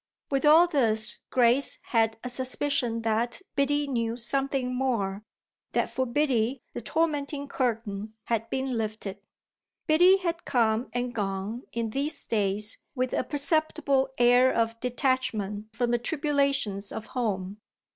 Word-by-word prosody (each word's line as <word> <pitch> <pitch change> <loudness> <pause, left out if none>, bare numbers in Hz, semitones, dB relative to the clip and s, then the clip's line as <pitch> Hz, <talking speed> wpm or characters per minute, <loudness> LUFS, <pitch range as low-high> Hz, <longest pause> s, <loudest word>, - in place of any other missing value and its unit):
With 275 +1 +1
all 320 +3 +8
this 225 -9 +3
Grace 250 +2 +3
had 225 -2 +1
a 250 - -3
suspicion 250 -2 -1
that 225 +2 0 0.2
Biddy 290 +1 +1
knew 230 -3 -1
something 270 +1 -1
more, 220 -6 -1 0.5
that - - 0
for 260 0 -1
Biddy 250 -2 0
the - - -5
tormenting 290 +1 -1
curtain 220 -5 -3
had 230 -1 -2
been 265 0 -2
lifted. 215 -3 -4 0.7
Biddy 355 +5 +6
had 345 -2 -3
come 230 -1 +1
and 245 0 -2
gone 205 +3 -3
in 230 -1 -3
these 285 +5 -1
days 210 -1 0 0.2
with 255 -1 -1
a - - +1
perceptible 290 -1 +1
air 245 +1 +5
of 230 0 0
detachment 230 -5 -1
from 240 +1 0
the 240 - +2
tribulations 275 - 0
of 215 - -6
home. 205 -5 -2
245 Hz, 135 wpm, -27 LUFS, 220-275 Hz, 0.7 s, all